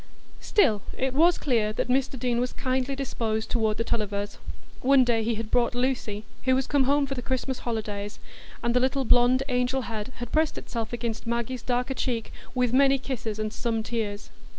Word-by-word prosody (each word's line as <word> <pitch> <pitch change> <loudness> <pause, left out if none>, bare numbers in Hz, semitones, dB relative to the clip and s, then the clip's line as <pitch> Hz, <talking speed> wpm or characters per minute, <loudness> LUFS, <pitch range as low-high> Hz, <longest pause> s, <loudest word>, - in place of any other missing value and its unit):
Still, 220 - +3 0.2
it 260 0 0
was 335 +5 +5
clear 225 -6 +1
that - - -1
Mr 265 +1 +1
Deane 240 0 0
was 250 +1 -1
kindly 260 +1 -1
disposed 225 -5 -2
toward 220 -3 +1
the 230 - 0
Tullivers. 205 -3 -2 0.4
One 270 0 +6
day 235 -2 +2
he 225 +1 0
had 220 0 -5
brought 245 0 +2
Lucy, 245 -5 -1 0.2
who 260 0 +4
was 260 0 +1
come 280 -2 +2
home 285 +1 +3
for 275 - -3
the 250 - -4
Christmas 260 +1 -2
holidays, 210 -3 -4 0.5
and 235 0 +1
the - - +6
little 265 +1 +1
blond 245 +2 +5
angel 250 0 +1
head 225 +2 -5
had 240 -1 -6
pressed 315 0 +2
itself 230 -2 -4
against 235 -2 -4
Maggie's 235 +1 -2
darker 250 +2 -1
cheek 240 -4 -2 0.2
with 250 -1 +2
many 275 +1 +5
kisses 240 -5 -4
and 215 0 -3
some 225 -1 -1
tears. 215 -3 -3
245 Hz, 190 wpm, -26 LUFS, 225-260 Hz, 0.5 s, One